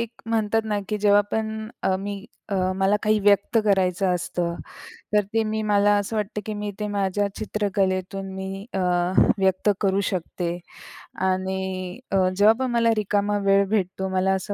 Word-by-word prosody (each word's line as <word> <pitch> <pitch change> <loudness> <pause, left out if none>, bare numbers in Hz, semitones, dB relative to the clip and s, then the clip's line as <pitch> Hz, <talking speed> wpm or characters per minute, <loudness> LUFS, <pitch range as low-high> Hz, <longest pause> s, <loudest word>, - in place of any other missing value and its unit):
एक 235 -1 -3 0.2
म्हणतात 225 -1 +1
ना 210 -1 -1
की 210 - -1
जेव्हा 205 0 +5
पण 220 0 -3
अ, 190 - +2
मी 200 +1 -5 0.5
मला 195 +2 +3
काही 215 0 +3
व्यक्त 200 +2 +3
करायचं 190 -1 +2
असतं. 175 -1 -2 0.6
तर 210 - +5
ते 225 - +3
मी 215 0 -2
मला 205 -1 +3
असं 205 +2 -2
वाटतं 210 0 -2
की 215 - -3
मी 205 0 -4
ते 210 - -1
माझ्या 200 0 0
चित्रकलेतून 195 -2 -1
मी 190 +1 -5
अ, - - 0 0.6
व्यक्त 190 +2 +2
करू 195 -1 +2
शकते 175 -1 -3 0.8
आणि 185 +1 -3
अ, 195 - +2 0.2
जेव्हा 210 +2 +6
पण 260 -2 -1
मला 230 -1 +3
रिकामा 205 0 +1
वेळ 195 0 +4
भेटतो. 190 -2 -1
मला 190 +1 +2
असं 190 +2 -3
200 Hz, 160 wpm, -24 LUFS, 190-210 Hz, 0.8 s, जेव्हा